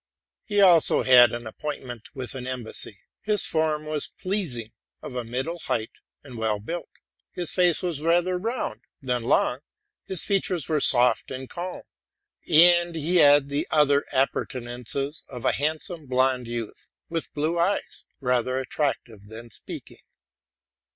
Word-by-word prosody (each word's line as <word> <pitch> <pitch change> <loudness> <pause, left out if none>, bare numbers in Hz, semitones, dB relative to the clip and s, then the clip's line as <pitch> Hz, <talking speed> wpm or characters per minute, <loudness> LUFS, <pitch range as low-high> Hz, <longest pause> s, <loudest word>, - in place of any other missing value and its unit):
He 205 -1 +1
also 175 -5 +6
had 125 -2 +7
an 120 0 -5
appointment 125 -1 -7
with 130 -2 -4
an 130 -1 -6
embassy; 115 -5 -3 0.2
his 210 0 0
form 155 -1 0
was 155 -1 -1
pleasing, 160 - -4 0.3
of - - -9
a 125 -1 -3
middle 130 +9 -4
height, 110 -7 -2 0.3
and 130 -5 -10
well 110 -2 0
built; 165 +11 -6 0.4
his 175 -2 -1
face 180 -1 +2
was 170 -5 -1
rather 175 +3 +1
round 230 +5 -3 0.2
than 125 -2 -1
long; 125 +2 +1 0.5
his 190 -4 +1
features 185 -6 0
were 155 -2 0
soft 125 -2 +5
and 130 0 -6
calm; 180 +4 -6 0.7
and 175 +1 +5
he 165 +3 0
had 145 -3 +6
the 140 +1 -2
other 145 -2 +3
appurtenances 130 +2 -2
of 125 -3 -8
a - - +4
handsome 155 +2 -3
blond 130 -1 +1
youth, 115 -2 -7
with 165 -1 -4
blue 155 +3 -1
eyes, 185 +4 -1 0.2
rather 125 0 0
attractive 125 -6 -3
than 115 +2 -11
speaking. - - -9
145 Hz, 145 wpm, -25 LUFS, 125-170 Hz, 0.7 s, had